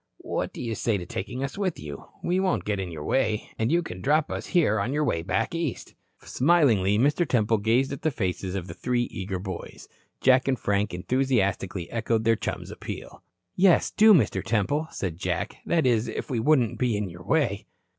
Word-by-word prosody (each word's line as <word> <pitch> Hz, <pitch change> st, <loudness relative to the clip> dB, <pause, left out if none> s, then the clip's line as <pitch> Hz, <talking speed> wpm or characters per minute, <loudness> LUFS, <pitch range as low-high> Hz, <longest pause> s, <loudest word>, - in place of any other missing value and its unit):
What -, -, -3 dB
do -, -, -7 dB
you 115 Hz, -2 st, -2 dB
say 110 Hz, 0 st, 0 dB
to 90 Hz, -, -6 dB
taking 110 Hz, +9 st, -5 dB
us 135 Hz, +8 st, -4 dB
with 185 Hz, -4 st, -1 dB
you? 70 Hz, -2 st, -8 dB, 0.2 s
We 180 Hz, +2 st, +1 dB
won't 190 Hz, -1 st, 0 dB
get 105 Hz, -2 st, -1 dB
in 95 Hz, -2 st, -3 dB
your 75 Hz, -2 st, -6 dB
way. 110 Hz, -, 0 dB
And 110 Hz, +4 st, +1 dB
you 175 Hz, +1 st, +3 dB
can 90 Hz, -, -7 dB
drop 150 Hz, +5 st, +2 dB
us -, -, -4 dB
here 145 Hz, -, +2 dB
on 120 Hz, +7 st, -1 dB
your 150 Hz, +1 st, +1 dB
way 85 Hz, -, 0 dB
back 110 Hz, -, -1 dB
East." 165 Hz, -6 st, -3 dB, 0.3 s
Smilingly, 125 Hz, -, +3 dB
Mr. 145 Hz, +8 st, +3 dB
Temple 115 Hz, -3 st, +2 dB
gazed 120 Hz, +6 st, +2 dB
at 140 Hz, -, -7 dB
the 155 Hz, -, +2 dB
faces 95 Hz, -, -3 dB
of 95 Hz, -3 st, -3 dB
the -, -, -8 dB
three 125 Hz, -1 st, 0 dB
eager 95 Hz, 0 st, -4 dB
boys. 95 Hz, -1 st, -7 dB, 0.3 s
Jack 130 Hz, 0 st, +4 dB
and 130 Hz, -1 st, +2 dB
Frank 100 Hz, -1 st, 0 dB
enthusiastically 100 Hz, -4 st, 0 dB
echoed 115 Hz, -1 st, 0 dB
their 115 Hz, 0 st, +4 dB
chum's -, -, -5 dB
appeal. -, -, -8 dB, 0.3 s
"Yes, 185 Hz, -2 st, +4 dB
do, 220 Hz, +1 st, +6 dB
Mr. 115 Hz, -, +1 dB
Temple," 140 Hz, +9 st, 0 dB
said 90 Hz, -, -4 dB
Jack. -, -, -2 dB
"That 165 Hz, -3 st, +2 dB
is, 120 Hz, -3 st, +2 dB
if -, -, -5 dB
we 120 Hz, -, 0 dB
wouldn't 125 Hz, -2 st, +2 dB
be 120 Hz, -4 st, +1 dB
in 105 Hz, -1 st, -2 dB
your 85 Hz, 0 st, -10 dB
way." 105 Hz, -, 0 dB
115 Hz, 205 wpm, -26 LUFS, 100-140 Hz, 0.3 s, do